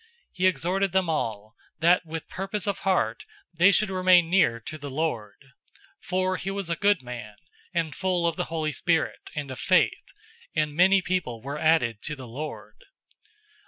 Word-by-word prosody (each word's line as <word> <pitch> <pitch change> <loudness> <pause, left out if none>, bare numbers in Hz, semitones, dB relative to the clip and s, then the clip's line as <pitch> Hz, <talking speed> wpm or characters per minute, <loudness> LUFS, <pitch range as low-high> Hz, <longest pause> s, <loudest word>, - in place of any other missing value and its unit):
He 185 0 +2
exhorted 185 +3 0
them 190 -3 +2
all, 110 -7 -3 0.2
that 170 +2 +3
with 160 0 -6
purpose 195 +1 -4
of 200 -1 -2
heart 115 - 0 0.3
they 180 +4 +6
should 200 +1 +3
remain 185 -2 +4
near 145 -11 +3
to 155 +7 -7
the 145 -1 -6
Lord. 130 -8 -2 0.7
011:024 - - -19
For 185 0 0
he 190 - -4
was 195 -3 -3
a - - +1
good 200 -7 +2
man, 120 -4 -8 0.4
and 165 -4 -1
full 180 0 0
of 170 - +1
the 180 - -2
Holy 160 -2 -2
Spirit 165 +3 -1
and 145 -3 -4
of 130 - -7
faith, 185 +8 +2 0.4
and 155 -2 0
many 185 +4 +4
people 175 -12 -2
were 140 +2 -5
added 125 -10 +2
to 150 - -5
the 130 -3 -10
Lord. 145 +7 -7
165 Hz, 175 wpm, -26 LUFS, 140-185 Hz, 0.7 s, they